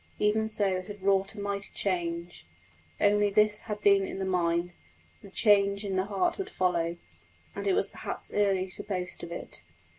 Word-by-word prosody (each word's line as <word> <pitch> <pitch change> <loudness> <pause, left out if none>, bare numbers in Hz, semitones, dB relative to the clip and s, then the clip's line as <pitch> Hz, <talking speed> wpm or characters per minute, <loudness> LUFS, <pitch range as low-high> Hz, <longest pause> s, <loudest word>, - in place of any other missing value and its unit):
Even 215 +1 +2
so 215 -2 +2
it 185 - -6
had 205 -2 -9
wrought 195 +1 +2
a - - -8
mighty 200 0 -2
change, 170 - -2 0.5
only 205 0 +4
this 210 +1 +3
had 210 -2 -5
been 200 -1 +5
in 190 - -5
the 190 - -2
mind; 175 -1 0 0.5
the 200 - -12
change 200 0 +3
in 195 -1 -2
the 185 0 +1
heart 210 - 0
would 390 - -3
follow, 170 -2 0 0.6
and 200 0 -3
it 195 - +3
was 195 - +2
perhaps - - -5
early 195 -2 +2
to - - -3
boast 180 -3 -3
of 170 - -7
it. 170 - -5
200 Hz, 185 wpm, -29 LUFS, 185-205 Hz, 0.6 s, been